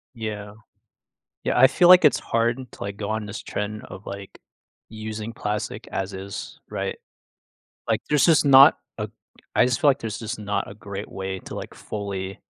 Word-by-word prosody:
Yeah. 105 -2 -5 0.9
Yeah, - - 0
I 130 - +9
feel 175 +5 +4
like 180 -1 +9
it's 145 - +5
hard 115 +1 +1
to, - - -8
like, 100 0 -5
go 105 -1 -4
on 110 0 -2
this 105 +2 -6
trend 105 +1 -4
of, 95 - -11
like, 100 0 -8 0.5
using 110 0 -6
plastic 105 -1 -4
as 95 +1 -3
is, 95 +1 -7
right? - - -3 0.9
Like - - +2
there's 150 -2 +4
just 160 -3 +5
not 135 0 +8 0.2
a - - -2 0.5
I - - +5
just 125 -1 0
feel 145 - +6
like 135 - 0
there's 110 -2 -4
just 110 -2 -5
not 100 -1 -2
a 100 - -9
great 100 0 -7
way 95 0 -4
to, - - -9
like, - - -7
fully 100 -2 -5
105 Hz, 180 wpm, -24 LUFS, 100-115 Hz, 0.9 s, I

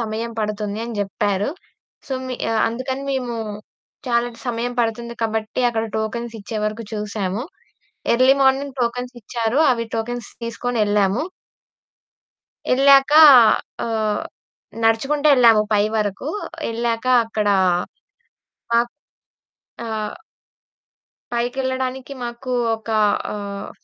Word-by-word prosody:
సమయం 230 +1 -3
పడుతుంది 210 0 -3
అని 235 -2 -6
జెప్పారు. 205 +2 -1 0.6
సో, 270 - -5
మి 255 - -3 0.3
అందుకని 260 +3 -4
మేమూ 250 -3 -2 0.7
చాలా 235 0 +2
ట్ - - -16
సమయం 240 +1 -2
పడుతుంది 235 +1 -2
కాబట్టి, 220 +1 -2
అక్కడ 225 -1 -1
టోకెన్సిచ్చే 225 -1 -4
వరకు 215 +2 -3
చూసాము. 210 0 -3 0.7
Early 260 +3 +5
morning 270 0 +2
టోకెన్సిచ్చారు. 240 0 -2
అవి 230 -1 -2
టోకెన్స్ 240 +2 -4 0.2
తీసుకొనెళ్ళాము. 220 -2 0 1.5
యెళ్ళాకా 275 +3 +6 0.7
ఆహ్, 220 -2 -1 0.6
నడుచుకుంటెళ్ళాము 250 -1 +4
పై 205 0 +4
వరకూ. 210 +5 -2 0.4
యెళ్ళాక 230 +1 -2 0.2
అక్కడా 210 -3 +1 1.2
మాక్ 235 +1 +2 0.9
ఆహ్ 215 -2 -3 1.2
పైకెళ్ళడానికి 260 +2 -2
మాకు 240 +2 -5 0.2
ఒకా 220 0 -2 0.3
ఆహ్, 200 -1 -6
230 Hz, 90 wpm, -21 LUFS, 215-250 Hz, 1.5 s, యెళ్ళాకా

